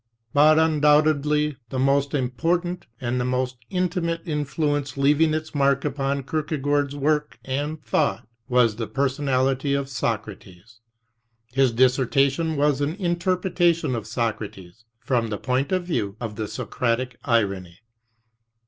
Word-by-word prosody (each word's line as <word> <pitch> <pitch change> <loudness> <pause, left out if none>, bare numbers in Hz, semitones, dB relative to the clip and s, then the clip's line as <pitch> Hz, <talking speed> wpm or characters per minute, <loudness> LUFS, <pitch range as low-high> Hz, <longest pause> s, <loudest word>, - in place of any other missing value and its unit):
But 155 +2 +6
undoubtedly 150 -1 +3
the 130 - -4
most 140 +2 +2
important 170 +7 -1
and 125 0 -1
the - - 0
most 125 0 -1
intimate 175 -2 -1
in 150 -3 -1
fluence 145 -1 -1
leaving 150 +3 +3
its 155 0 -5
mark 140 -1 +2
upon 140 -1 -1
Kierkegaard's 145 -1 -1
work 150 +1 0
and 145 +4 -3
thought, 110 - 0 0.2
was 120 -4 +3
the 115 -2 -3
personality 135 +2 0
of 140 -1 -2
Socrates. 110 -4 -5 0.7
His 135 -1 +3
dissertation 135 +5 +2
was 145 -1 +2
an 145 +3 -1
inter 180 -1 0
pretation 175 -6 +1
of 110 -2 -5
Socrates 110 -3 -4
from 120 -3 0
the 105 -2 -3
point 130 - -1
of 185 -1 0
view 105 - -2
of 110 -3 -5
the 110 0 -3
Socratic 125 +2 -2
irony. 100 -7 0
140 Hz, 130 wpm, -24 LUFS, 125-155 Hz, 0.7 s, But